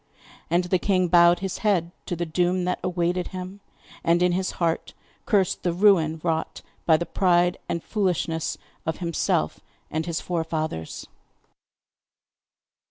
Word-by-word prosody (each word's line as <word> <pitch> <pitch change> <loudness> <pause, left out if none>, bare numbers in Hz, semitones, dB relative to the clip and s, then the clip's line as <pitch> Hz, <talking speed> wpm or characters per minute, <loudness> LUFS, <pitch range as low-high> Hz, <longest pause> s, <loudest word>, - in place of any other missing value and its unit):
And 175 +2 +2
the 180 +1 +1
king 185 -1 +2
bowed 175 0 +6
his 190 -1 -3
head 185 -6 +1 0.2
to 175 - -2
the 175 +1 -2
doom 180 +3 +1
that 180 - -1
awaited 175 0 0
him, 185 +1 -7 0.4
and 170 +1 +3
in 180 - +4
his 185 +1 -1
heart 165 -2 -1 0.3
cursed 195 -5 +2
the 175 - 0
ruin 170 -4 +4
wrought 160 -2 -2 0.2
by 160 -2 +6
the 170 - -3
pride 175 -1 +2
and 170 - -2
foolishness 170 -6 -1 0.3
of 160 -1 -2
himself 170 - 0 0.3
and 160 +2 -2
his 170 -1 -1
forefathers. 160 - -3
175 Hz, 140 wpm, -25 LUFS, 165-185 Hz, 0.4 s, bowed